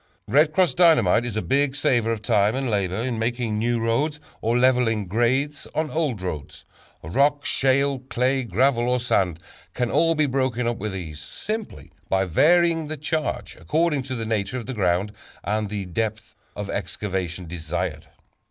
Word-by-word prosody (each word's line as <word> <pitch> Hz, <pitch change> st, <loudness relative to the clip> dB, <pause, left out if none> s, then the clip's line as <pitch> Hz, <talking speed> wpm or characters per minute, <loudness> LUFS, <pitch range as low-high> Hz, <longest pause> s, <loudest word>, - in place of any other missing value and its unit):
"Red 150 Hz, +3 st, +4 dB
Cross" 180 Hz, +2 st, +2 dB
Dynamite 140 Hz, -, +4 dB
is 115 Hz, -3 st, -3 dB
a 110 Hz, -, -1 dB
big 140 Hz, 0 st, +1 dB
saver 120 Hz, -5 st, +1 dB
of 110 Hz, -1 st, -3 dB
time 105 Hz, +1 st, +2 dB
and 135 Hz, -3 st, -1 dB
labor 95 Hz, -3 st, 0 dB
in 115 Hz, +1 st, -2 dB
making 115 Hz, -2 st, -1 dB
new 120 Hz, +1 st, +1 dB
roads, 140 Hz, +7 st, 0 dB, 0.2 s
or 115 Hz, +2 st, +1 dB
leveling 125 Hz, -4 st, +3 dB
grades 125 Hz, +9 st, 0 dB
on 155 Hz, -1 st, -1 dB
old 145 Hz, -, -1 dB
roads. 75 Hz, -5 st, -6 dB, 0.4 s
Rock, 140 Hz, -, +1 dB
shale, 135 Hz, +1 st, +2 dB
clay, 130 Hz, +1 st, 0 dB
gravel 125 Hz, 0 st, +1 dB
or 125 Hz, 0 st, +2 dB
sand, 95 Hz, -8 st, +1 dB, 0.4 s
can 125 Hz, -2 st, -1 dB
all 165 Hz, 0 st, +3 dB
be 155 Hz, -1 st, +3 dB
broken 130 Hz, -3 st, 0 dB
up 120 Hz, -1 st, -1 dB
with 105 Hz, -3 st, -4 dB
ease, 80 Hz, -5 st, -6 dB
simply 80 Hz, -, -6 dB, 0.2 s
by 95 Hz, 0 st, +2 dB
varying 165 Hz, -, +3 dB
the 155 Hz, +1 st, -4 dB
charge 155 Hz, +1 st, -2 dB
according 155 Hz, -2 st, +1 dB
to 130 Hz, 0 st, -5 dB
the 115 Hz, -2 st, -4 dB
nature 110 Hz, +2 st, -1 dB
of 120 Hz, -, -5 dB
the 130 Hz, -, -4 dB
ground 95 Hz, -1 st, +1 dB, 0.3 s
and 105 Hz, 0 st, -1 dB
the 100 Hz, -2 st, -4 dB
depth 110 Hz, +4 st, -3 dB, 0.2 s
of 105 Hz, -1 st, -4 dB
excavation 95 Hz, -2 st, -3 dB
desired. 80 Hz, -1 st, -4 dB
120 Hz, 170 wpm, -24 LUFS, 100-140 Hz, 0.4 s, Red